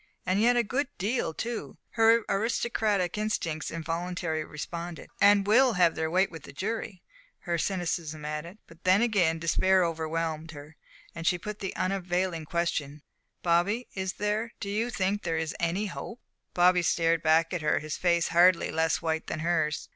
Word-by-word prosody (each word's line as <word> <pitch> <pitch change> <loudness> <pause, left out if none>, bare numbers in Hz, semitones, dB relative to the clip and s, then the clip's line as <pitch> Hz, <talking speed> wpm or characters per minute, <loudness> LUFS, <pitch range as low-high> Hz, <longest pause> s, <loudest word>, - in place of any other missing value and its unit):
"And 185 +3 +1
yet 245 +2 +4
a 240 - +4
good 260 +6 -1
deal, 210 -2 -1
too," 230 +7 -5
her 225 0 +4
aristocratic 210 -2 0
instincts 170 -7 -2
involuntarily 165 0 -3
responded; 170 +3 -7
"and 200 0 +6
will 245 +4 +5
have 175 -4 +4
their 160 0 -2
weight 190 +4 +2
with 165 -2 -9
the - - -11
jury," 200 +1 -4 0.4
her 170 -2 -2
cynicism 165 -5 -2
added. 150 +5 -5
But 165 +1 -18
then 185 +4 +4
again 185 -8 +2
despair 180 +3 +3
overwhelmed 160 0 -3
her, 145 +1 -11 0.4
and 165 -1 -5
she 180 - +3
put 210 +4 -7
the 195 - -4
unavailing 180 -3 -1
question: 150 -3 -2 0.4
"Bobby, 180 +8 +1
is 190 -1 -3
there 210 +3 -2
do 200 - -4
you 225 +4 0
think 200 -2 -1
there 165 -2 -1
is 160 -1 -3
any 175 +5 0
hope?" 225 +5 -7 0.4
Bobby 180 0 +5
stared 165 -1 +2
back 160 +2 +3
at 175 - -2
her, 155 - +2
his 155 -1 -4
face 170 -2 +1
hardly 175 +1 +4
less 160 0 0
white 160 -1 -1
than 155 - -4
hers. 160 -3 0
175 Hz, 170 wpm, -28 LUFS, 165-205 Hz, 0.4 s, and